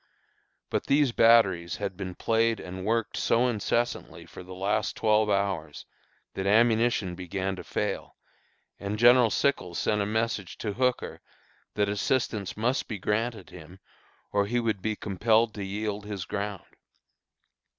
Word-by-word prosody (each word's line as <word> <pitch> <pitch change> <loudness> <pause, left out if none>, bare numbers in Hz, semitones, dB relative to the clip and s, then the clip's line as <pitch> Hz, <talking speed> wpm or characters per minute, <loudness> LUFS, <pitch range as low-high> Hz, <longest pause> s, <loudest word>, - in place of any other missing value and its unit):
But - - -1
these 140 -2 +3
batteries 100 -8 +4
had 100 -2 -4
been 90 -1 -6
played 115 0 +1
and 95 +1 -7
worked 115 0 0
so 120 +2 +2
incessantly 120 +1 -2
for - - -11
the 90 +1 -10
last 100 +3 -1
twelve 110 -1 +2
hours, 95 -7 -1 0.5
that 95 0 -3
ammunition 115 -2 +3
began 95 +2 -3
to - - -7
fail, - - -3 0.6
and 100 +1 -3
General 120 +1 +6
Sickles 95 -10 0
sent 105 -1 +1
a 100 - -1
message 110 -4 -2
to 105 -2 -3
Hooker 125 +2 -1 0.5
that 105 -1 +2
assistance 105 -1 -1
must 120 +5 0
be 110 - -4
granted 105 +1 -2
him, 90 +2 -12 0.5
or 100 0 +1
he 120 +3 0
would 110 -5 -1
be 110 +1 -1
compelled 110 +3 +1
to 100 - -5
yield 105 +1 -4
his 100 -4 -5
ground. 100 -1 -4
105 Hz, 145 wpm, -27 LUFS, 95-115 Hz, 0.6 s, General